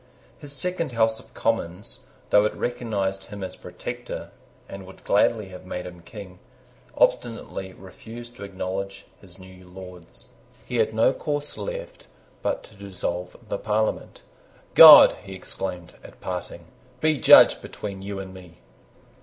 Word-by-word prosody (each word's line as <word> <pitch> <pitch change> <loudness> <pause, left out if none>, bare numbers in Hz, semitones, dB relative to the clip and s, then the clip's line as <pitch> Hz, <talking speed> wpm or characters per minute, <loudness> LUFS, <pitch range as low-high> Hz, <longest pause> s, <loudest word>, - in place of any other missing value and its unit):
His 145 -2 -9
second 165 0 -3
House 110 -1 +2
of - - -19
Commons, 100 -4 -2 0.3
though 105 - +6
it 105 - -1
recognised 100 -6 -2
him 100 -1 -8
as 95 - -6
Protector, - - -7 0.4
and 95 -1 -9
would 95 - -15
gladly 105 0 +2
have 90 -1 -11
made 90 -1 -6
him 90 -1 -10
King, 95 -1 -11 0.6
obstinately 105 -5 0
refused 115 +6 -11
to 100 - -9
acknowledge 95 0 -5 0.2
his 95 -2 -13
new 95 -1 -14
Lords. 90 -2 -12 0.4
He 125 - -3
had 110 -1 +2
no 110 +4 +3
course 145 +1 -3
left - - -7 0.3
but - - -2
to - - -16
dissolve 90 -3 -5
the - - -3
Parliament. 110 0 -2 0.5
"God," - - +11
he 95 - -9
exclaimed, 90 -2 -6
at - - -14
parting, 90 -1 -6 0.3
"be 155 -1 +1
judge - - +7
between 100 -2 -7
you 100 0 -6
and 95 -1 -7
me!" 90 -3 -14
100 Hz, 145 wpm, -24 LUFS, 95-115 Hz, 0.6 s, God